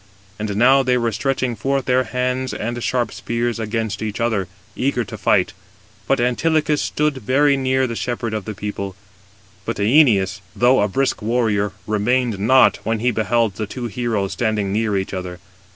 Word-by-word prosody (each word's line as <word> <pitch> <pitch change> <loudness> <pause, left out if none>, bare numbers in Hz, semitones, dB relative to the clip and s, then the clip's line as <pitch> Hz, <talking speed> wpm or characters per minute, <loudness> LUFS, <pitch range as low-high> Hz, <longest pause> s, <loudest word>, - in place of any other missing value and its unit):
And 105 -1 -3
now 130 +5 +5
they 125 -1 +2
were 115 -1 0
stretching 130 +1 -1
forth 135 +4 -1
their 130 0 +2
hands 125 0 -2
and 120 +2 -4
sharp 125 -2 0
spears 120 0 -2
against 110 -1 -3
each 110 0 -4
other, 110 -5 0 0.3
eager 125 -2 0
to 115 - -8
fight; 95 -3 +2 0.5
but 135 - +2
Antilochus 150 +5 +1
stood 150 -2 0
very 140 +5 +2
near 130 0 +1
the 115 -2 -4
shepherd 120 -1 -3
221 110 - -1
of 95 - -15
the 110 -3 -7
people. 100 -2 -4 0.7
But - - -3
Æneas, 105 - +3 0.2
though 125 +1 +4
a 105 - +2
brisk 130 +6 -1
warrior, 110 -3 0
remained 110 +1 0
not, 130 +6 +5
when 115 0 -1
he 125 +2 +1
beheld 110 -1 0
the 110 - -3
two 125 +2 -6
heroes 110 -3 -2
standing 105 -4 -1
near 105 -1 0
each 95 +1 -3
other. 90 -1 -5
115 Hz, 175 wpm, -20 LUFS, 105-130 Hz, 0.7 s, now